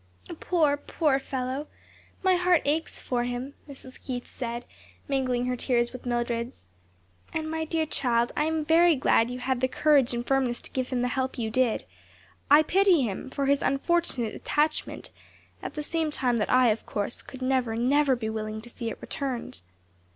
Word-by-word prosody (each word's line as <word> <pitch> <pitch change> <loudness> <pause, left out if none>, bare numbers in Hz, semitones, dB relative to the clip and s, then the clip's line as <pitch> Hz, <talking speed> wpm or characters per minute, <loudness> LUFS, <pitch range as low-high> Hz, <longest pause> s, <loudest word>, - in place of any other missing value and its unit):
"Poor, 310 -5 +2
poor 290 -1 +1
fellow! 265 +2 -3 0.6
my 375 -1 +4
heart 355 -2 +3
aches 310 +3 0
for 245 -2 -1
him," 245 +3 -4 0.2
Mrs. 265 -2 -11
Keith 245 -2 -4
said, 240 -1 -5 0.4
mingling 255 -3 0
her 250 0 0
tears 240 -1 0
with 255 0 -8
Mildred's. 240 - -2 0.7
"And, 315 0 -1
my 320 0 -2
dear 320 0 0
child 240 -5 +1
I 300 - +1
am 315 -1 -1
very 335 +1 +5
glad 240 -3 +3
you 250 - -4
had 255 0 -1
the 260 - +3
courage 275 -3 +3
and 240 0 -3
firmness 260 -3 +1
to - - -8
give 255 -1 -2
him 245 -2 0
the - - +2
help 260 +1 -2
you 225 -2 -2
did. 250 -1 +1 0.7
I 295 +2 +8
pity 370 -3 +4
him, 220 +3 -4
too, - - -16
for 280 - 0
his 280 0 +3
unfortunate 275 -5 +1
attachment, 305 +1 -1 0.5
at - - -6
the 300 - -3
same 320 0 0
time 250 -5 +1
that 210 - -1
I, 255 -1 +5
of 215 +1 -1
course, 205 +2 -3
could 260 -1 -9
never, 255 -3 +1
never 270 +3 +3
be 230 -2 -4
willing 215 0 -4
to 240 +1 -11
see 230 -1 -4
it - - -6
returned. 255 - -4
260 Hz, 185 wpm, -27 LUFS, 240-295 Hz, 0.7 s, I